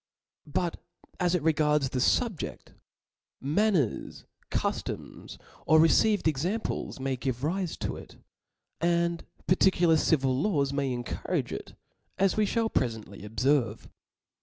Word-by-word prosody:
But 170 +3 -1 0.4
as 180 0 +2
it 170 - -1
regards 150 -3 +2
the 125 - -2
fubjeft; 215 - 0 0.7
manners, 160 - 0 0.2
cuftoms, - - -4 0.3
or 160 +1 +6
received 200 +5 +4
exam 170 - 0
ples - - -4
may 135 0 -1
give 125 -1 -3
rife 175 +2 -1
to - - -2
it, - - -12 0.6
and 170 0 +1 0.2
particular 180 -3 +4
civil 135 -5 +2
laws 140 -3 +1
may 140 -2 0
encourage 120 -1 -3
it, - - -7 0.4
as 195 0 +2
we 215 -1 +2
(hall 230 +2 +1
prefcntly 110 - -2
obferve. 120 +5 0
155 Hz, 120 wpm, -28 LUFS, 135-180 Hz, 0.7 s, or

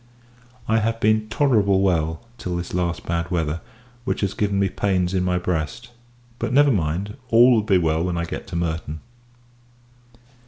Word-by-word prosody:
I 110 0 +3
have 115 +1 -1
been 110 0 +2
tolerable 110 -7 +3
well, 80 -3 0 0.2
till 90 -5 -3
this 85 0 -5
last 85 -1 -2
bad 85 0 -2
weather, 80 -2 -1 0.4
which - - -2
has 100 -1 0
given 100 -1 0
me 100 0 +2
pains 95 -1 0
in 95 - +1
my 90 -1 +1
breast; 90 +4 -3 0.5
but, - - -2
never 145 +2 +5
mind, 95 - -1
all 120 +3 +7
will 115 -3 +4
be 105 -3 +3
well 80 -1 +1
when 90 -1 -2
I 85 - -1
get 85 - -6
to 95 - -7
Merton. 80 -2 -3
90 Hz, 170 wpm, -22 LUFS, 85-110 Hz, 0.5 s, all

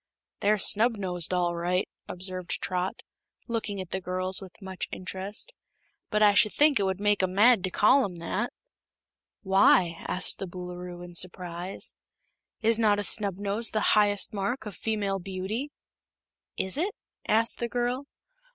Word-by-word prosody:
"They're 210 +1 +3
snubnosed, 200 -5 +3
all 175 -1 0
right," 180 +2 0 0.2
observed 185 -1 -4
Trot, 180 0 -3 0.4
looking 220 -4 -3
at 185 -2 -7
the 190 - -2
girls 185 +1 -2
with 190 -1 -12
much 190 -2 -5
interest; 195 - -4 0.6
"but 215 -1 +2
I 205 -1 +6
should 210 +1 +4
think 295 -3 +4
it 200 - +1
would 190 0 -1
make 205 0 +2
'em 185 0 -1
mad 220 -1 +5
to - - -2
call 255 +9 +4
'em 190 -5 -4
that." 185 +7 -3 0.9
"Why?" 190 -3 +4
asked 180 - +2
the 195 - -4
Boolooroo, 180 0 -8
in 175 - -12
surprise. 180 +1 -2 0.7
"Is 225 +1 +4
not 210 -2 +4
a 205 - -1
snubnose 200 +2 +1
the 215 - +1
highest 205 -1 +3
mark 205 +5 -2
of 205 -4 -7
female 200 -1 -1
beauty?" 195 +8 -4 0.9
"Is 190 +9 +1
it?" 385 +5 -1 0.3
asked 225 +2 +2
the 235 - -2
girl. 245 +3 -2
195 Hz, 150 wpm, -27 LUFS, 185-215 Hz, 0.9 s, I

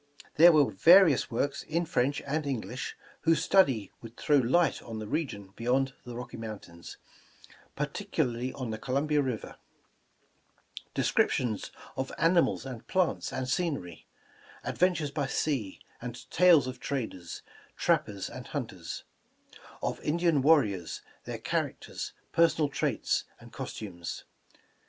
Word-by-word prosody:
There 170 +3 +9
were 150 -4 +4
vari 170 - +7
ous - - -2
works 140 +4 -1
in 170 +2 -1
French 140 -3 0
and 150 +1 -1
English, 130 -1 -4 0.2
whose 165 -1 +3
study 135 - +3
would 115 0 -11
throw 150 - +3
light 140 +7 +3
on 115 -2 -7
the 110 - -5
region 105 -7 -3
beyond 130 +3 +1
the 120 -1 -7
Rocky 125 0 -7
Mountains, 105 -7 -8 0.8
particularly 125 +1 -2
on 125 -4 -4
the 110 - -4
Columbia 140 +4 +1
River; 130 -5 -4 1.4
descriptions 110 -5 +1 0.2
of 130 0 -3
animals 165 -6 +3
and 125 -3 -8
plants 185 -3 0
and 130 - -3
scenery; 130 - -2 0.6
adventures 175 -5 +1
by 140 -1 -1
sea, 130 -9 -1 0.2
and 125 0 -7
tales 170 -6 +6
of 130 -1 -6
traders, 110 - -4 0.3
trappers 100 -2 +1
and - - -8
hunters; - - -5 0.8
of - - -1
Indian 165 -2 +2
warriors, 130 - +2 0.2
their - - -4
characters, - - -3 0.2
personal 165 -3 +3
traits - - 0
and - - -15
cos - - -5
tumes. 85 -6 -6
135 Hz, 130 wpm, -29 LUFS, 115-155 Hz, 1.4 s, There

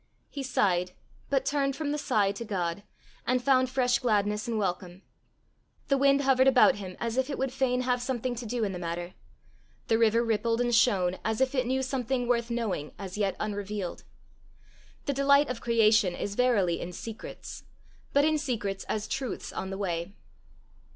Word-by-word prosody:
He 280 - -5
sighed 180 -8 +1 0.4
but 275 -2 +1
turned 275 -2 0
from 290 -1 -2
the 300 - -1
sigh 205 -7 +2
to 235 - -6
God, 185 -4 -2 0.5
and 255 +1 +3
found 260 0 +3
fresh 250 -2 +2
gladness 210 -2 0
and 230 -2 -1
welcome. 185 -2 -3 0.9
The 275 - +4
wind 275 0 +4
hovered 265 -1 +4
about 255 -5 +6
him 185 -3 -7
as 230 +1 -2
if 260 +1 +1
it 280 - -3
would 265 -1 -2
fain 255 -1 +1
have 250 -1 0
something 250 -1 -2
to 235 0 -5
do 235 +1 -1
in 200 - 0
the 180 - -5
matter; 175 +1 -4 0.8
the 225 - +3
river 230 +1 +4
rippled 230 +1 0
and 240 0 +1
shone 195 -7 +3
as 220 0 -1
if 265 0 +2
it 255 -3 0
knew 265 +1 0
something 255 -1 -1
worth 235 -1 +1
knowing 220 -11 -2
as 190 -2 -7
yet 200 -2 0
unrevealed. 205 -3 -4 1.0
The 280 - 0
delight 280 +1 +4
of 240 - -6
creation 215 -5 +3
is 200 - -4
verily 205 -8 +2
in 180 - -6
secrets, 225 +5 -8 0.5
but 285 +1 +4
in 310 0 +2
secrets 210 -8 -3
as 215 0 -3
truths 265 -1 -4
on 190 - -4
the 195 - -4
way. 180 -1 -3
230 Hz, 180 wpm, -28 LUFS, 200-260 Hz, 1.0 s, about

